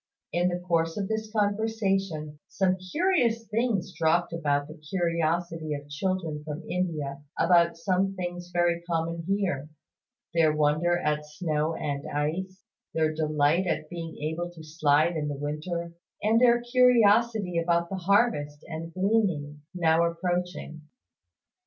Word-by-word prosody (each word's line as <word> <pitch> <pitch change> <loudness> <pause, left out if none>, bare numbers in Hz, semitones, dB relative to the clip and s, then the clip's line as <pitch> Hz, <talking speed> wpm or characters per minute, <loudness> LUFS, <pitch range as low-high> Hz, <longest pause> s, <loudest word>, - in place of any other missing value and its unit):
In 175 +1 +2
the 175 - -1
course 165 -1 0
of 200 -2 -1
this 220 0 -3
conversation 195 -7 -1
some 185 -2 +1 0.2
curious 275 -11 +2
things 215 -5 -1
dropped 170 +1 +1
about 145 -3 0
the 155 - -9 0.2
curiosity 165 -2 -1
of 145 0 -9
children 160 -1 -2
from 150 +2 -6
India 155 -6 -2 0.2
about 170 -1 +4
some 190 +3 0
things 175 -1 -5
very 175 -1 +1
common 165 0 -1
here; 185 -8 -1 0.6
their 160 -2 +3
wonder 155 +4 +2
at 150 -2 0
snow 155 0 -1
and 140 -1 -3
ice, 180 +6 -3 0.3
their 155 -1 +2
delight 155 +3 +2
at 155 -2 -2
being 165 -2 -6
able 160 +3 -2
to 160 - -10
slide 155 +1 +2
in 150 -2 -1
the 145 -1 -3
winter, 165 +4 -4 0.3
and 220 +3 +4
their 240 -1 +6
curiosity 230 -6 +4
about 170 0 +1
the 195 - -3
harvest 185 -6 +1
and 165 0 -6
gleaning, 185 -8 0
now 165 -1 +3
approaching. 175 -1 -2
170 Hz, 135 wpm, -27 LUFS, 155-190 Hz, 0.6 s, their